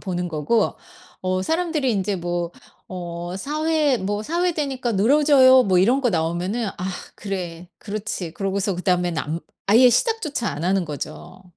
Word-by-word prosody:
보는 180 -2 -3
거고 165 +8 +1 0.5
어 185 0 0
사람들이 320 - 0
인제 195 -1 -1
뭐 175 0 -3 0.3
어 175 -1 -6
4 300 +8 -3
회 305 -4 +3
뭐 205 0 -2
"4 340 +7 -1
회 360 - +2
되니까 265 -6 -2
늘어져요." 260 +4 +6
뭐 190 -5 +2
이런 245 +9 +3
거 245 - +2
나오면은 175 +6 -1
'아 180 - -5 0.3
그래. 180 -4 -5
그렇지.' 200 -5 -5
그러고서 195 0 -1
그다음엔 180 -2 0
안 155 +3 -3 0.3
아예 235 +5 +7
시작조차 305 - 0
안 150 - -5
하는 185 +1 +1
거죠. 155 +4 -7
195 Hz, 295 characters per minute, -22 LUFS, 175-260 Hz, 0.5 s, 아예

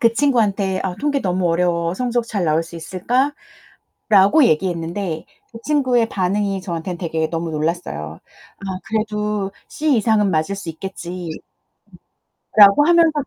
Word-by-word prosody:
그 230 -1 +4
친구한테 205 -9 +1
"아 185 - -2
통계 285 -1 0
너무 180 -2 0
어려워 170 0 0
성적 240 +1 -1
잘 200 -6 -2
나올 160 0 +2
수 170 - -13
있을까?"라고 210 - 0
얘기했는데 170 -2 -1 0.3
그 230 - -9
친구의 255 -6 +2
반응이 195 +1 -1
저한텐 175 -1 -4
되게 160 -2 -2
너무 165 0 -3
놀랐어요. 150 - -3 0.4
"아 195 - -10 0.2
그래도 210 -2 -2 0.2
C 300 -4 +1
이상은 215 -3 +2
맞을 160 +5 0
수 185 -4 -8
있겠지." 180 0 -7 1.3
라고 205 +7 +8
하면서 335 -1 +5
195 Hz, 300 characters per minute, -20 LUFS, 170-230 Hz, 1.3 s, 라고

